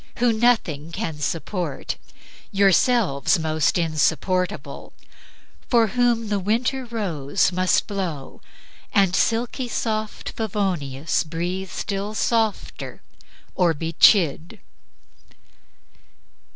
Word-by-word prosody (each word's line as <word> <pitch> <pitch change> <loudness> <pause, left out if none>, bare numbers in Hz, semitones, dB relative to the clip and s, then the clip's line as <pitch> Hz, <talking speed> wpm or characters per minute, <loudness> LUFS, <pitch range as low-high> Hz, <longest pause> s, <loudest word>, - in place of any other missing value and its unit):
who 240 -1 +3
nothing 210 -10 +1
can 160 -2 -4
support 165 0 -3 0.6
(Yourselves 195 - +3
most 160 -1 +1
insupportable) 175 +3 -1 0.8
for 230 -3 +4
whom 240 -2 +1
The 205 -1 0
winter 240 +7 0
rose 190 - -1
must 185 0 +2
blow,...... 180 -9 -5 0.5
and 195 -2 +3
silky 240 +4 0
soft 215 -2 -3
Favonius 180 -10 -1
breathe 175 +4 -4
still 200 +3 -4
softer 225 -2 -1 0.5
or 175 -3 +2
be 165 +2 -4
chid!" 170 -3 +4
190 Hz, 85 wpm, -23 LUFS, 165-220 Hz, 0.8 s, for